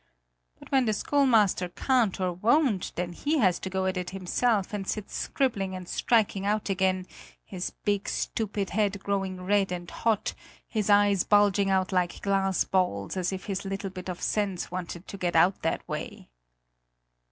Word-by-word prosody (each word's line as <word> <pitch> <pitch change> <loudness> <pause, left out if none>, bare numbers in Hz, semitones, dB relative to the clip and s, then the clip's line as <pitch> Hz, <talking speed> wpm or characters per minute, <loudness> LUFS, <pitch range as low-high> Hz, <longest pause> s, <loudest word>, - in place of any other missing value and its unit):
But - - -15
when 265 -2 +4
the 215 - +1
schoolmaster 220 -7 +2
can't 230 0 +1
or 185 -1 0
won't, 225 - +2
then 175 0 -3
he 295 - 0
has 185 -9 +3
to 190 - -5
go 190 0 -1
at 190 0 0
it 180 0 -3
himself 195 +3 0
and 195 -2 -3
sits 215 -2 -4
scribbling 200 -8 -1
and 185 -1 -7
striking 210 -3 +1
out 210 +1 0
again, 185 -1 +1 0.4
his 180 -1 -5 0.2
big 205 -1 0
stupid 205 -3 -2
head 200 -1 0
growing 195 -2 -2
red 195 0 +2
and 175 -1 -5
hot, 225 -3 0 0.3
his 215 -2 -2
eyes 205 -2 +5
bulging 205 -1 +3
out 190 0 +1
like 180 -2 0
glass 195 -1 +2
balls, 180 - 0
as 185 -1 -1
if 190 -1 -5
his 195 -2 -3
little 195 0 -4
bit 185 0 -7
of 180 - -5
sense 200 -5 -1
wanted 180 0 -6
to 200 - -8
get 175 -2 -1
out 180 +4 +4
that - - -2
way." - - -6
195 Hz, 175 wpm, -27 LUFS, 185-205 Hz, 0.4 s, eyes